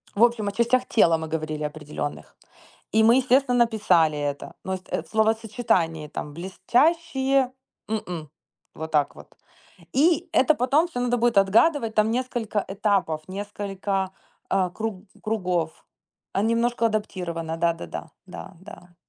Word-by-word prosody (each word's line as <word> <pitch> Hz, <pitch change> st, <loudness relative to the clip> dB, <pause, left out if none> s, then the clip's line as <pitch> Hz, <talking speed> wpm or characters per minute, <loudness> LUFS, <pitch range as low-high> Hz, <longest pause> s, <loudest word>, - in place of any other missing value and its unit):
В 210 Hz, -, +4 dB
общем, 235 Hz, -3 st, +3 dB
о -, -, 0 dB
частях 235 Hz, +4 st, +2 dB
тела 165 Hz, -7 st, +4 dB
мы 160 Hz, 0 st, -5 dB
говорили 155 Hz, -1 st, -3 dB
определённых, 150 Hz, -1 st, -5 dB, 0.6 s
и 220 Hz, -, +4 dB
мы, 230 Hz, +2 st, +6 dB
естественно, 260 Hz, -1 st, +3 dB
написали 210 Hz, -10 st, +3 dB
это. 145 Hz, -1 st, -4 dB
Но 190 Hz, -, -2 dB
и -, -, -1 dB
ст 185 Hz, -, -20 dB
э, -, -, -1 dB
в -, -, -21 dB
словосочетании 220 Hz, -7 st, +1 dB
там 150 Hz, 0 st, -6 dB
блестящие, 265 Hz, -, +1 dB, 0.4 s
м-м, 180 Hz, -8 st, -4 dB, 0.5 s
вот 160 Hz, +1 st, -6 dB
так 150 Hz, -2 st, +1 dB
вот. -, -, -13 dB, 0.7 s
И 335 Hz, +5 st, +3 dB
это 295 Hz, +4 st, +4 dB
потом 285 Hz, +7 st, +2 dB
всё 285 Hz, -8 st, -5 dB
надо 245 Hz, 0 st, +1 dB
будет 235 Hz, -2 st, +2 dB
отгадывать, 225 Hz, +5 st, +4 dB
там 215 Hz, +1 st, +3 dB
несколько 240 Hz, -4 st, -1 dB
этапов, 195 Hz, -6 st, 0 dB
несколько, 195 Hz, -1 st, -3 dB, 0.4 s
а, 190 Hz, -2 st, +2 dB
круг 205 Hz, 0 st, -5 dB, 0.2 s
кругов, 180 Hz, -7 st, -2 dB, 0.5 s
а, -, -, 0 dB
н 215 Hz, -, +1 dB
немножко 230 Hz, 0 st, +1 dB
адаптировано, 175 Hz, -7 st, -2 dB
да-да-да, 170 Hz, 0 st, -2 dB
да 190 Hz, +1 st, -9 dB
да. 180 Hz, -3 st, -13 dB
205 Hz, 145 wpm, -25 LUFS, 170-240 Hz, 0.7 s, мы